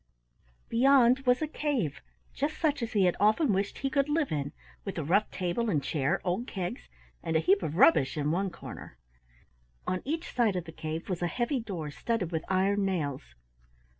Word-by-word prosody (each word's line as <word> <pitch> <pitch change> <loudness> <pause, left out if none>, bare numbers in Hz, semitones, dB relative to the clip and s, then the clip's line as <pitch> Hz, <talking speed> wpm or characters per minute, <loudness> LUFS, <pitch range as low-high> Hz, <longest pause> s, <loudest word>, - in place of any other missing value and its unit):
Beyond 255 +1 +4
was 250 +4 +4
a - - 0
cave, 275 - -2 0.3
just 290 +3 -2
such 300 -4 +1
as 235 +1 -3
he 205 -3 +3
had 180 - +2
often 215 - +3
wished 195 +1 -1
he 275 - -1
could 280 0 +1
live 300 -1 +1
in, 145 -2 -2 0.3
with 195 - -5
a 160 - -1
rough 195 +8 +2
table 185 +5 -1
and 150 -8 +1
chair, 155 +5 0
old 190 +7 -1
kegs, 175 - -5 0.3
and 165 - -2
a - - +5
heap 190 +5 +3
of 160 -3 -3
rubbish 150 -6 +5
in 150 0 0
one 190 +3 0
corner. 170 - -10 0.9
On 185 - -1
each 325 +5 -3
side 230 -6 +2
of 180 -2 -3
the 165 - -8
cave 160 +1 -5
was 180 -3 -3
a 175 - +1
heavy 245 - -1
door 180 -10 -5
studded 200 0 -2
with 160 -1 -2
iron 195 +2 +2
nails. 145 - -2
195 Hz, 195 wpm, -29 LUFS, 165-240 Hz, 0.9 s, a